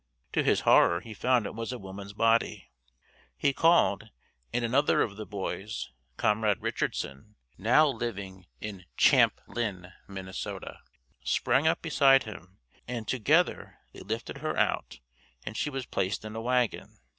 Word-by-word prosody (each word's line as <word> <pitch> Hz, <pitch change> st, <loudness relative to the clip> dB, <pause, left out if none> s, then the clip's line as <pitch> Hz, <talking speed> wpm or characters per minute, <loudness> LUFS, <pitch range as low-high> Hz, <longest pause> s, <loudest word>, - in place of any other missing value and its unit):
To -, -, +2 dB
his -, -, +2 dB
horror 85 Hz, 0 st, +5 dB
he 110 Hz, +1 st, -9 dB
found 125 Hz, 0 st, +2 dB
it -, -, -5 dB
was 115 Hz, +2 st, -4 dB
a 125 Hz, -, -4 dB
woman's 100 Hz, 0 st, -9 dB
body. 115 Hz, -4 st, +1 dB, 0.7 s
He 140 Hz, -, +2 dB
called 120 Hz, -, +3 dB, 0.4 s
and 120 Hz, -, 0 dB
another 135 Hz, +5 st, +3 dB
of 100 Hz, -, -4 dB
the 110 Hz, 0 st, -7 dB
boys, 100 Hz, -2 st, -5 dB, 0.3 s
Comrade 105 Hz, -1 st, +2 dB
Richardson, 70 Hz, +11 st, -3 dB, 0.2 s
now 125 Hz, +10 st, +4 dB
living 100 Hz, -8 st, -5 dB
in 100 Hz, -4 st, -7 dB
Champlin, 95 Hz, -7 st, +2 dB, 0.2 s
Minn., 95 Hz, -1 st, -7 dB, 0.9 s
sprang 140 Hz, +4 st, +2 dB
up 160 Hz, -, +1 dB
beside 135 Hz, -4 st, +5 dB
him 95 Hz, -3 st, -11 dB, 0.3 s
and 120 Hz, -3 st, -5 dB
together 150 Hz, +9 st, +1 dB, 0.2 s
they -, -, -11 dB
lifted 110 Hz, +3 st, -5 dB
her -, -, -3 dB
out -, -, 0 dB, 0.5 s
and 110 Hz, -, -5 dB
she 150 Hz, -, -1 dB
was 135 Hz, -3 st, -4 dB
placed 95 Hz, 0 st, -2 dB
in 110 Hz, 0 st, -7 dB
a 115 Hz, -, -3 dB
wagon. 125 Hz, -1 st, -1 dB
110 Hz, 145 wpm, -29 LUFS, 100-125 Hz, 0.9 s, horror